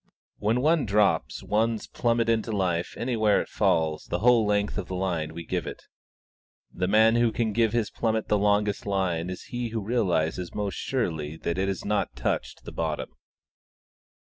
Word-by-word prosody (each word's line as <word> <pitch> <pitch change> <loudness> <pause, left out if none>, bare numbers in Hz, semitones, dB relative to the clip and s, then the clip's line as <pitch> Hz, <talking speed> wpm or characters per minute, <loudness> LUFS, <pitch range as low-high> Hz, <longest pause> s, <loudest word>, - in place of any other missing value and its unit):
When 110 +4 +1
one 155 -2 +2
drops 100 - +1
one's 110 +1 0
plummet 115 -1 0
into 115 0 +1
life 90 -4 -1
anywhere 110 -4 +2
it - - -4
falls 80 -2 +1
the - - -1
whole 115 +1 +4
length 105 0 0
of 95 - -5
the 95 - -4
line 85 -4 -2
we 85 -1 -6
give - - -2
it. - - -7 0.9
The 90 0 -1
man 110 +3 +5
who 120 -1 +3
can 110 -2 -1
give 115 0 +2
his 115 -3 0
plummet 110 -1 -1
the - - +2
longest 105 0 +1
line 90 -4 0
is 90 - -6
he 120 -1 -4
who 115 0 -3
realises 90 -6 -1
most 100 -2 -2
surely 80 - -2
that 85 +2 -2
it 95 - +1
has 95 -2 -3
not 105 0 -1
touched - - -3
the - - -8
bottom. - - -3
105 Hz, 175 wpm, -26 LUFS, 90-115 Hz, 0.9 s, man